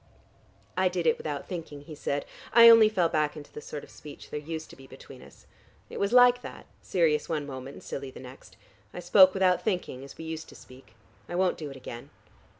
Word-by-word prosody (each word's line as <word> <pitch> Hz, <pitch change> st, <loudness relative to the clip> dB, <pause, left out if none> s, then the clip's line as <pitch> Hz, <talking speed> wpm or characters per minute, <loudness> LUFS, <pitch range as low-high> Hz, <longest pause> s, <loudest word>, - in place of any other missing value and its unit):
'" -, -, -31 dB, 0.3 s
"I 185 Hz, 0 st, +3 dB
did 180 Hz, -2 st, -3 dB
it 160 Hz, -, +2 dB
without 145 Hz, -2 st, -5 dB
thinking," 160 Hz, -5 st, -7 dB
he 155 Hz, +2 st, -11 dB
said. 145 Hz, -1 st, -3 dB, 0.3 s
"I 235 Hz, 0 st, +9 dB
only 225 Hz, -2 st, +8 dB
fell 185 Hz, -6 st, +1 dB
back 155 Hz, -1 st, -1 dB
into 145 Hz, -1 st, -11 dB
the 150 Hz, -, -8 dB
sort 150 Hz, 0 st, -8 dB
of -, -, -14 dB
speech 150 Hz, -1 st, -12 dB
there 150 Hz, -, -3 dB
used 160 Hz, +1 st, -7 dB
to -, -, -13 dB
be 135 Hz, 0 st, -15 dB
between -, -, -13 dB
us. -, -, -17 dB, 0.5 s
It -, -, -6 dB
was 200 Hz, +1 st, 0 dB
like 245 Hz, 0 st, +6 dB
that, -, -, -10 dB, 0.2 s
serious 155 Hz, -4 st, 0 dB
one 155 Hz, -3 st, -2 dB
moment 135 Hz, -1 st, -8 dB
and -, -, -13 dB
silly 135 Hz, -1 st, -6 dB
the 130 Hz, -, -12 dB
next. 130 Hz, +1 st, -13 dB, 0.4 s
I -, -, -5 dB
spoke 185 Hz, +2 st, +6 dB
without 185 Hz, -2 st, +2 dB
thinking, 180 Hz, -, -3 dB
as 140 Hz, -, -12 dB
we 160 Hz, -, -8 dB
used 160 Hz, 0 st, -6 dB
to -, -, -14 dB
speak. 130 Hz, +1 st, -16 dB, 0.3 s
I 175 Hz, -, -4 dB
won't 185 Hz, 0 st, +1 dB
do 150 Hz, -2 st, -6 dB
it 135 Hz, -, -10 dB
again." 120 Hz, -2 st, -9 dB
160 Hz, 230 wpm, -27 LUFS, 145-185 Hz, 0.5 s, I